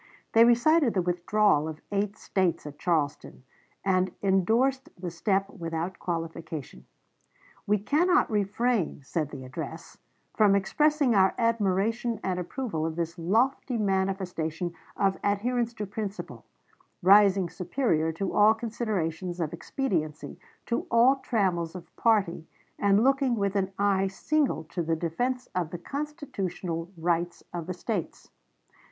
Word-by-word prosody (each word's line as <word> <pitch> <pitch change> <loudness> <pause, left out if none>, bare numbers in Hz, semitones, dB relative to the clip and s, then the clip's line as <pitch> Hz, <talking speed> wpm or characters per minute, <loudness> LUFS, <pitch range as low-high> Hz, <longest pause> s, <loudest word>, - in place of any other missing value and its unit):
They 230 +1 +7
recited 240 +2 +4
the 185 - +3
withdrawal 180 -2 +2
of 160 -1 -6
eight 205 +1 -1
States 185 -6 -1
at 145 0 -9
Charleston, 155 -6 -1 0.4
and 185 -1 +2
indorsed 225 +8 +2
the 175 -1 -4
step 195 +3 0
without 165 0 -4
qualification. 165 - -5 0.8
"We 210 +1 +3
cannot 345 - +3
refrain," 210 - 0
said 155 +1 -2
the 135 -3 -8
address, 130 - -7 0.4
"from 210 -3 +5
expressing 290 +6 +2
our 190 -2 +4
admiration 225 +1 +1
and 185 -1 -1
approval 180 - -3
of 160 0 -2
this 170 +1 -3
lofty 235 +8 +1
manifestation 190 -4 -1 0.2
of 195 -1 +1
adherence 230 +4 0
to 210 - -4
principle, 205 0 -6 0.6
rising 195 -1 +6
superior 175 - 0
to 185 +4 -3
all 215 +2 +6
considerations 185 -7 -3
of 160 -2 -2
expediency, 165 - -3 0.3
to 235 - -2
all 245 +4 +5
trammels 185 -10 -1
of 175 -2 -11
party, 195 -8 +1 0.3
and 200 +2 +4
looking 270 -1 +3
with 200 -2 -1
an 195 -1 0
eye 195 -1 +2
single 270 - 0
to 175 - -4
the 165 0 0
defense 245 +11 -2
of 180 -3 -1
the 175 - -5
constitutional 190 - -4
rights 170 +1 -1
of 170 -2 -5
the 185 - -2
States." 185 -1 -4
195 Hz, 130 wpm, -27 LUFS, 170-230 Hz, 0.8 s, They